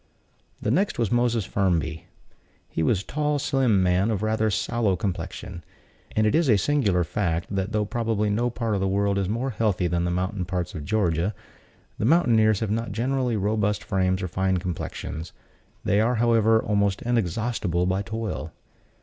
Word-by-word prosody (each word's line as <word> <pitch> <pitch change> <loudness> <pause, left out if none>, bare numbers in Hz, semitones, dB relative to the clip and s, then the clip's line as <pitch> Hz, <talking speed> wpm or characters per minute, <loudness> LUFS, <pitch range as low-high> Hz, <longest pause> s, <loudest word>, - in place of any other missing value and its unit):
The 105 - -1
next 195 - +1
was 115 -4 0
Moses 120 -3 +2
Firmby. 85 -5 -1 0.6
He - - -3
was 95 +4 +1
a - - -27
tall, 150 0 0
slim 130 -8 +2
man, 90 +3 +2
of 110 -2 -1
rather 110 0 +1
sallow 110 -1 0
complexion; 90 -1 -5 0.5
and 110 - +3
it 105 - +2
is 160 -3 +3
a 110 - +6
singular 100 -8 +2
fact, 85 +1 -2
that 95 +2 -1
though 105 -1 0
probably 110 -1 -1
no 120 +4 +1
part 115 -2 -2
of 100 - 0
the 95 - +1
world 100 +1 +1
is 95 -1 -1
more 120 +5 -1
healthy 105 -5 0
than 85 0 0
the 90 - 0
mountainous 90 +1 -2
parts 90 -1 -3
of 75 -5 -6
Georgia, 90 0 0 0.6
the - - 0
mountaineers 115 - +4
have 110 -2 -1
not 115 +1 -2
generally 125 +2 0
robust 105 0 0
frames 95 0 0
or - - -1
fine 95 +1 0
complexions: 85 -2 -5 0.5
they 100 - +3
are, 120 +3 +2
however, 115 -1 +4
almost 100 -2 0
inexhaustible 110 -5 0
by 95 +2 0
toil. 110 -7 -4
105 Hz, 175 wpm, -25 LUFS, 95-115 Hz, 0.6 s, a